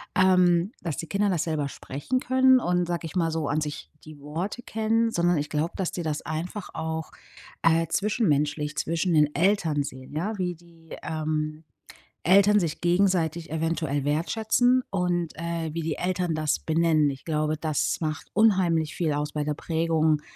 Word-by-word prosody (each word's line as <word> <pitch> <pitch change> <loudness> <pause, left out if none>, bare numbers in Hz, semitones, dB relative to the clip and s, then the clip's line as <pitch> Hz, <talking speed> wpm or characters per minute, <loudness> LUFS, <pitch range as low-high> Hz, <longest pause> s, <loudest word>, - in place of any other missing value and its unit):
ähm, 180 0 +4
dass 165 -4 -3
die 165 - -5
Kinder 205 +1 +1
das 170 -4 0
selber 155 -4 -1
sprechen 145 - -3
können 260 0 +4
und 180 -2 +1
sage 170 -1 -3
ich 160 - -6
mal 165 -2 +1
so, 160 -2 -2
an 150 - +1
sich 150 -1 -5
die 155 -2 -12
Worte 170 +11 -4
kennen, 225 +1 +1
sondern 175 -2 +2
ich 145 +1 -2
glaube, 155 +3 -1
dass 190 -3 -2
die 175 - -4
das 155 -2 -2
einfach 175 +6 -5
auch, 160 0 -4 0.5
äh, 165 0 +3
zwischenmenschlich 150 - 0
zwischen 170 +2 0
den 150 -1 +3
Eltern 165 -4 +2
sehen. 130 -1 -9
Ja, 205 +7 -2
wie 180 -2 -2
die, 165 -1 -14
ähm, 155 0 -3 0.6
Eltern 200 +4 +5
sich 165 -4 -3
gegenseitig 175 -3 +1
eventuell 160 -3 -1
wertschätzen 220 - +2
und, 175 -3 0
äh, 165 -1 -3
wie 165 - -2
die 155 -1 -2
Eltern 180 -2 -1
das 155 -1 0
benennen. 160 -2 +2
Ich 135 -1 -7
glaube, 155 -1 0
das 155 -2 0
macht 155 -1 -3
unheimlich 185 -7 +3
viel 165 -3 0
aus 150 +1 -2
bei 150 - -1
der 150 0 -2
Prägung 160 -1 +1
165 Hz, 170 wpm, -26 LUFS, 155-180 Hz, 0.6 s, Eltern